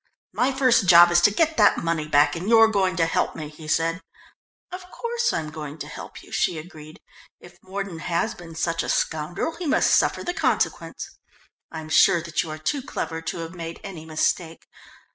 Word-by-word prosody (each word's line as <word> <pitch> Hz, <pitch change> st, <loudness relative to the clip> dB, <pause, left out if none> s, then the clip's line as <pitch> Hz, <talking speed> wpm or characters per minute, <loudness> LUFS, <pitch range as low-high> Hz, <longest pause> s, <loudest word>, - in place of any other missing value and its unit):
"My 255 Hz, +2 st, +1 dB
first 255 Hz, -7 st, +3 dB
job 175 Hz, 0 st, +8 dB
is 175 Hz, 0 st, +4 dB
to 210 Hz, -, +6 dB
get 320 Hz, +8 st, +1 dB
that 210 Hz, -2 st, +5 dB
money 165 Hz, -2 st, -2 dB
back, 145 Hz, +1 st, +3 dB
and 180 Hz, +5 st, -4 dB
you're 225 Hz, -1 st, +6 dB
going 190 Hz, -4 st, +1 dB
to 165 Hz, -1 st, +2 dB
help 165 Hz, -, -1 dB
me," 155 Hz, -2 st, -6 dB
he 155 Hz, +1 st, -12 dB
said. 165 Hz, +3 st, 0 dB, 0.7 s
"Of 365 Hz, 0 st, -9 dB
course 470 Hz, +2 st, -2 dB
I'm 155 Hz, -1 st, -3 dB
going 150 Hz, -1 st, -7 dB
to -, -, -7 dB
help -, -, -10 dB
you," -, -, -17 dB
she 170 Hz, -, 0 dB
agreed. 155 Hz, -1 st, -11 dB, 0.4 s
"If 175 Hz, -, -16 dB
Mordon 190 Hz, -2 st, -6 dB
has 170 Hz, +1 st, -1 dB
been 165 Hz, -2 st, -12 dB
such 165 Hz, 0 st, -1 dB
a -, -, -5 dB
scoundrel, 160 Hz, -, -2 dB
he 350 Hz, -, -5 dB
must 290 Hz, -, +2 dB
suffer -, -, +2 dB
the 355 Hz, -, -3 dB
consequence. -, -, -1 dB, 0.6 s
I'm 160 Hz, -1 st, -7 dB
sure 170 Hz, -, +5 dB
that 170 Hz, +2 st, -1 dB
you 165 Hz, -, -7 dB
are 155 Hz, -, -5 dB
too 275 Hz, -, -2 dB
clever 165 Hz, -10 st, -5 dB
to 165 Hz, -, -5 dB
have 165 Hz, -, -11 dB
made 165 Hz, -2 st, -7 dB
any 180 Hz, -6 st, -8 dB
mistake. 160 Hz, +1 st, -2 dB
170 Hz, 200 wpm, -23 LUFS, 160-205 Hz, 0.7 s, job